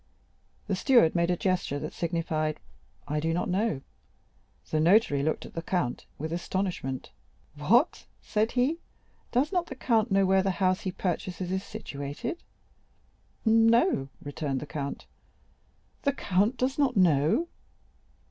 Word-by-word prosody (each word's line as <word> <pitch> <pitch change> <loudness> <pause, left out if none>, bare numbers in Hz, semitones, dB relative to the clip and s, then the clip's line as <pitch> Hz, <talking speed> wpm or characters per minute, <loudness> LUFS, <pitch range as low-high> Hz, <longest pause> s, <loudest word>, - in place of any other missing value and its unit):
The 200 - -1
steward 235 - +4
made 170 0 +1
a 180 - +1
gesture 185 -7 0
that 155 +2 -5
signified, 160 -2 -1 0.5
"I 150 +1 -1
do 165 +2 0
not 175 - -1
know." 185 -6 0 0.9
The 155 - +2
notary 165 -3 +4
looked 155 +2 -1
at - - -11
the 165 - -3
count 170 -8 -2
with 160 +2 -4
astonishment. 175 -7 -3 0.4
"What!" 210 - +2
said 215 +2 0
he, 260 +7 +1 0.5
"does 265 +5 +2
not 355 -2 0
the 265 - -7
count 230 -3 +1
know 195 -1 +3
where 190 0 +4
the 190 -2 -1
house 185 -1 +2
he 185 - -2
purchases 180 -1 -3
is 190 +1 -1
situated?" 145 - -6 1.0
"No," 225 - +4
returned 145 -2 -3
the - - -6
count. 140 -1 -5 1.0
"The 280 - +1
count 205 +1 +1
does 260 +4 -1
not 260 -5 +2
know?" 175 - +3
185 Hz, 140 wpm, -28 LUFS, 155-225 Hz, 1.0 s, steward